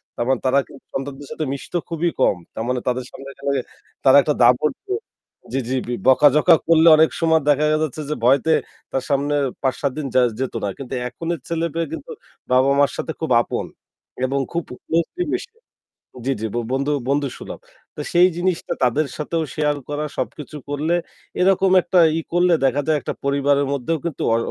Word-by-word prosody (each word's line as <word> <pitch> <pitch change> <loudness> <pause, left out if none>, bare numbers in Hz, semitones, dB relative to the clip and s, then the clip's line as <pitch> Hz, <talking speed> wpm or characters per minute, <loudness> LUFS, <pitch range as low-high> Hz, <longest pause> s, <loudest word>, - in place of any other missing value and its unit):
তার 120 - -2
মানে 130 - +2
তারা 135 +2 +4
কিন্তু 135 - -16
সন্তানদের 140 +1 -5
সাথে 155 - -3
মিশত 140 - -8 0.2
খুবই 170 +1 0
কম। - - +4 0.2
তার 110 - -4
মানে 125 0 0
তাদের 125 0 -1
সামনে 135 +1 -10 0.8
তারা 135 +1 +8
একটা 150 - 0
ধমক, 125 +5 +4 1.3
বকাঝকা 150 +5 +6
করলে 165 0 +5
অনেক 160 +1 +5
সময় 160 -1 +3
দেখা 145 +1 +3 0.2
যাচ্ছে 155 0 -4
যে 150 - -1
ভয়ে 135 +3 +5 0.5
তার 130 - -1
সামনে 145 +1 +1 0.3
৫-৭ 135 +1 0
দিন 150 - -3
যে 130 - +6 0.2
যেত 130 -1 -2
না। 100 - 0
কিন্তু 135 -1 -7 0.2
এখনের 165 +4 -4
ছেলেমেয়ে 165 0 -2
কিন্তু - - -7 0.4
বাবা-মায়ের 140 +2 +4
সাথে - - -3
খুব 160 -4 -3
আপন - - -3 0.6
এবং 135 +2 -1
খুব 170 -1 -1 0.2
ক্লোজলি 170 - 0
মিশে। 465 - -4 0.7
জি, 135 - +1
জি। - - -1 0.3
বন্ধু 140 +2 0 0.2
বন্ধুসুলভ। 140 -2 -2 0.4
তো 150 - -5
সেই 175 +1 +6
জিনিসটা 175 -1 -1
তাদের 140 +5 +2
সাথেও 160 +2 -2
শেয়ার 150 -1 +1
করা, 145 +1 -2
সবকিছু 150 0 -5
করলে 155 +4 0 0.5
এরকম 190 0 +3
একটা 180 +1 +2 0.2
ই - - -3
করলে 175 0 +4
দেখা 140 +2 +2
যায় 155 -2 +2
একটা - - -4
পরিবারের 140 0 +2
মধ্যেও 150 +5 -1
কিন্তু 165 -5 -3
অ - - +2
145 Hz, 165 wpm, -21 LUFS, 135-165 Hz, 1.3 s, তারা